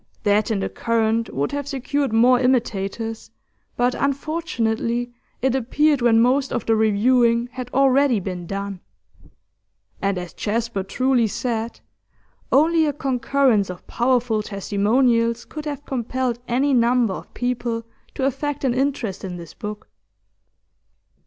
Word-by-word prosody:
That 205 Hz, +1 st, +2 dB
in 210 Hz, -3 st, 0 dB
The -, -, -1 dB
Current 230 Hz, 0 st, 0 dB
would 140 Hz, +1 st, -1 dB
have 285 Hz, -1 st, -3 dB
secured 280 Hz, 0 st, -1 dB
more 245 Hz, +3 st, +5 dB
imitators, 225 Hz, -3 st, -1 dB, 0.5 s
but 245 Hz, +1 st, +2 dB
unfortunately 245 Hz, -5 st, -1 dB, 0.3 s
it 265 Hz, -1 st, +2 dB
appeared 275 Hz, +3 st, +2 dB
when 230 Hz, -1 st, +4 dB
most 260 Hz, +3 st, +2 dB
of -, -, -2 dB
the 225 Hz, -, +3 dB
reviewing 235 Hz, +2 st, +3 dB
had 250 Hz, -1 st, -6 dB
already 270 Hz, -2 st, +3 dB
been 180 Hz, -2 st, -5 dB
done. 200 Hz, 0 st, -4 dB, 1.2 s
And, 195 Hz, -1 st, 0 dB
as 180 Hz, -1 st, -6 dB
Jasper 230 Hz, -1 st, -2 dB
truly 245 Hz, +4 st, +1 dB
said, 230 Hz, +1 st, -3 dB, 0.7 s
only 320 Hz, +3 st, +4 dB
a 290 Hz, -, 0 dB
concurrence 260 Hz, -6 st, +1 dB
of 180 Hz, -1 st, -8 dB
powerful 240 Hz, -3 st, +1 dB
testimonials 230 Hz, +4 st, +1 dB
could 305 Hz, -1 st, -8 dB
have 290 Hz, -1 st, -5 dB
compelled 250 Hz, -1 st, -2 dB
any 270 Hz, +4 st, +1 dB
number 240 Hz, -3 st, +3 dB
of -, -, -9 dB
people 240 Hz, -2 st, -2 dB, 0.3 s
to 265 Hz, -, -1 dB
affect 290 Hz, +2 st, -2 dB
an 260 Hz, -3 st, +2 dB
interest 255 Hz, -7 st, -1 dB
in 185 Hz, -2 st, -5 dB
this 170 Hz, -2 st, -10 dB
book. 210 Hz, 0 st, -7 dB
240 Hz, 135 wpm, -22 LUFS, 220-265 Hz, 1.2 s, more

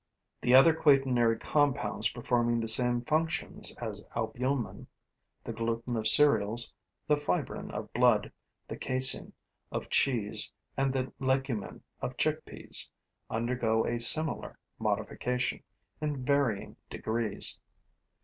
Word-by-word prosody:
The 125 Hz, +1 st, +4 dB
other 135 Hz, +5 st, +7 dB
quaternary 135 Hz, -7 st, +3 dB
compounds 145 Hz, +2 st, +1 dB
performing 120 Hz, -1 st, 0 dB
the 115 Hz, -, -3 dB
same 120 Hz, +1 st, +5 dB
functions 160 Hz, +4 st, 0 dB
as -, -, -4 dB
albumen 130 Hz, -1 st, -3 dB, 0.6 s
the 115 Hz, -, -6 dB
gluten 115 Hz, +1 st, -3 dB
of 110 Hz, -1 st, 0 dB
cereals, 115 Hz, -4 st, +4 dB, 0.3 s
the 150 Hz, -, +4 dB
fibrin 145 Hz, -11 st, -3 dB
of -, -, -7 dB
blood, -, -, +3 dB, 0.4 s
the -, -, -7 dB
casein 130 Hz, 0 st, +2 dB, 0.4 s
of -, -, -5 dB
cheese 115 Hz, -7 st, +1 dB, 0.2 s
and 135 Hz, 0 st, 0 dB
the 130 Hz, -1 st, -3 dB
legumin 130 Hz, -4 st, -2 dB, 0.2 s
of -, -, -5 dB
chickpeas -, -, -1 dB, 0.4 s
undergo 115 Hz, -1 st, 0 dB
a 120 Hz, 0 st, -2 dB
similar 155 Hz, +7 st, +1 dB, 0.2 s
modification, 125 Hz, 0 st, -2 dB, 0.4 s
in 145 Hz, -4 st, -3 dB
varying 140 Hz, -7 st, 0 dB
degrees. 110 Hz, -1 st, 0 dB
125 Hz, 110 wpm, -29 LUFS, 115-135 Hz, 0.6 s, other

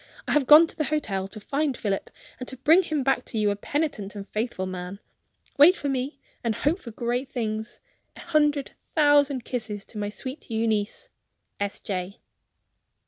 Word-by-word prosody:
I -, -, -1 dB
have 295 Hz, -3 st, +3 dB
gone 305 Hz, +3 st, +10 dB
to -, -, -6 dB
the 305 Hz, -, -1 dB
hotel 200 Hz, -12 st, -1 dB
to 205 Hz, +2 st, -10 dB
find 280 Hz, +4 st, -1 dB
Philip, 195 Hz, -2 st, -2 dB, 0.3 s
and 255 Hz, -, -6 dB
to 260 Hz, -, -7 dB
bring 315 Hz, +8 st, +6 dB
him 310 Hz, -6 st, -1 dB
back 265 Hz, -1 st, +2 dB
to -, -, -5 dB
you 210 Hz, -1 st, +3 dB
a -, -, -1 dB
penitent 215 Hz, -4 st, -2 dB
and 200 Hz, -1 st, -7 dB
faithful 215 Hz, -3 st, -2 dB
man. 185 Hz, +1 st, -6 dB, 0.6 s
Wait 330 Hz, +6 st, +9 dB
for 285 Hz, -, -3 dB
me, 270 Hz, +2 st, -2 dB, 0.2 s
and 230 Hz, -2 st, 0 dB
hope 295 Hz, +10 st, +1 dB
for 255 Hz, -, -9 dB
great 240 Hz, +3 st, -2 dB
things. 220 Hz, -1 st, -3 dB, 0.4 s
A. -, -, -10 dB
hundred 295 Hz, -4 st, +1 dB, 0.2 s
thousand 290 Hz, -4 st, +4 dB
kisses 215 Hz, -5 st, -4 dB
to 215 Hz, -, -8 dB
my 205 Hz, 0 st, -2 dB
sweet 260 Hz, +7 st, -8 dB
Euneece. 220 Hz, -, -1 dB, 0.5 s
"S. 200 Hz, 0 st, -2 dB
J." 190 Hz, 0 st, -4 dB
245 Hz, 180 wpm, -26 LUFS, 210-290 Hz, 0.6 s, gone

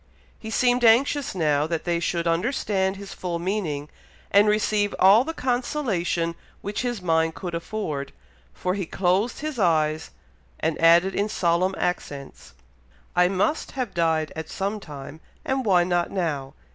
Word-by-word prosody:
He 220 Hz, -, -7 dB
seemed 245 Hz, +2 st, +2 dB
anxious 260 Hz, +3 st, +3 dB
now 150 Hz, -3 st, +1 dB
that 165 Hz, -1 st, -2 dB
they 170 Hz, -1 st, 0 dB
should 170 Hz, 0 st, -1 dB
understand 190 Hz, +1 st, 0 dB
his 200 Hz, 0 st, -9 dB
full 175 Hz, -2 st, -3 dB
meaning, 170 Hz, -6 st, -2 dB, 0.4 s
and 200 Hz, +1 st, +6 dB
receive 210 Hz, -1 st, +1 dB
all 200 Hz, +5 st, +6 dB
the 320 Hz, -, -3 dB
consolation 245 Hz, -, -1 dB, 0.3 s
which 205 Hz, +1 st, -3 dB
his 240 Hz, -6 st, -3 dB
mind 160 Hz, -1 st, +1 dB
could 180 Hz, -3 st, -6 dB
afford, 165 Hz, -5 st, -4 dB, 0.4 s
for 180 Hz, -, -2 dB
he 190 Hz, -3 st, -3 dB
closed 195 Hz, +9 st, 0 dB
his 305 Hz, -5 st, -4 dB
eyes, 155 Hz, -4 st, +1 dB, 0.5 s
and 160 Hz, 0 st, -1 dB
added 170 Hz, +3 st, +5 dB
in 205 Hz, +1 st, 0 dB
solemn 185 Hz, -1 st, +1 dB
accents, 140 Hz, -, -4 dB, 0.6 s
"I 180 Hz, 0 st, +5 dB
must 195 Hz, -, -1 dB
have 250 Hz, -7 st, -3 dB
died 160 Hz, -2 st, +1 dB
at 160 Hz, 0 st, -6 dB
some 200 Hz, +2 st, -3 dB
time, 145 Hz, -3 st, -9 dB, 0.3 s
and 265 Hz, 0 st, 0 dB
why 180 Hz, -4 st, +4 dB
not 175 Hz, -1 st, 0 dB
now? 145 Hz, -8 st, -3 dB
180 Hz, 150 wpm, -24 LUFS, 165-215 Hz, 0.6 s, and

